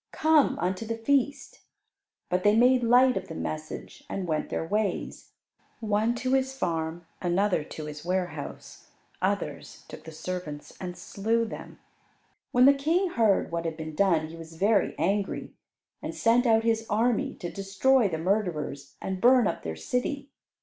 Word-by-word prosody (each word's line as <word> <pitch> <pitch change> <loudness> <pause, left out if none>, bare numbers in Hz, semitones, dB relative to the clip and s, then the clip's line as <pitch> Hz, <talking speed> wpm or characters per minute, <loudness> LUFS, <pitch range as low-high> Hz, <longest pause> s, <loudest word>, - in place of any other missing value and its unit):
Come 310 -2 +3
unto 185 +4 -1
the 225 0 -3
feast.'" 280 +3 0 0.7
But 180 0 0
they 205 +1 +5
made 250 +2 +5
light 250 +2 +5
of - - -4
the - - -7
message 80 -1 -6
and 190 -2 -3
went 155 -2 -1
their - - -2
ways, 205 +1 -2 0.5
one 220 +1 +1
to 255 +2 -1
his 265 0 +1
farm, 165 -4 -2 0.2
another 180 -1 +1
to 155 +1 -8
his 150 0 -8
warehouse; 180 -4 -4 0.3
others - - -3
took - - -11
the 160 - -8
servants 160 -2 -6
and 180 -1 -5
slew 225 +6 -1
them. 220 - -9 0.7
When 245 +1 +5
the 280 - +8
King 325 +7 +1
heard 220 - +2
what 170 0 -2
had 160 -1 -3
been 160 -1 -6
done, 165 -2 +2
he 165 - -9
was 165 0 -11
very 200 +3 +2
angry, 200 +1 -1 0.5
and - - -5
sent 240 +2 +3
out 225 -1 +4
his 225 -1 +1
army 245 +6 +1
to 175 - -6
destroy 205 +5 +2
the 160 - -2
murderers, 160 -7 -2
and 190 -1 -3
burn 250 -1 +6
up - - -1
their 80 -1 -5
city. 275 - -3
200 Hz, 165 wpm, -27 LUFS, 165-245 Hz, 0.7 s, the